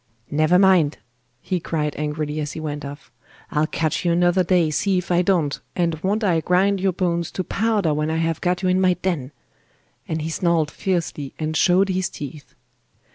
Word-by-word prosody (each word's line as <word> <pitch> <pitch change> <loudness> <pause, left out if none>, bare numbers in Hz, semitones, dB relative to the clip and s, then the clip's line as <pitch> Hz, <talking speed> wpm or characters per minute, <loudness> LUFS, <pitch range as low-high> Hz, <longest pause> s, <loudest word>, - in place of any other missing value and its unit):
'Never 155 +4 +3
mind!' 185 -6 +4 0.4
he 185 -2 -2
cried 150 -3 -2
angrily 150 0 -3
as 150 -1 -3
he - - -6
went 150 -1 -4
off, 140 -1 -9 0.4
'I'll 150 +1 +1
catch 155 -2 -1
you 175 - +2
another 175 +2 +3
day, 175 -3 +2
see 190 +5 +1
if 180 0 -3
I 175 0 +4
don't, 170 -6 +1 0.2
and 170 -3 0
won't 205 +4 0
I 170 -5 +2
grind 190 +3 +2
your 190 0 +2
bones 170 -2 -1
to 185 - -2
powder 205 -5 0
when 150 +1 -1
I 160 - -1
have 165 -1 -1
got 180 +1 0
you 185 - +2
in 185 +1 +2
my 185 -1 +3
den!' 170 -8 -2 0.8
and 160 -1 -2
he 160 - -3
snarled 165 -3 +1
fiercely 170 -7 -3
and 155 0 -3
showed 185 +4 +4
his 185 0 0
teeth. 145 +1 -9
170 Hz, 190 wpm, -22 LUFS, 155-185 Hz, 0.8 s, mind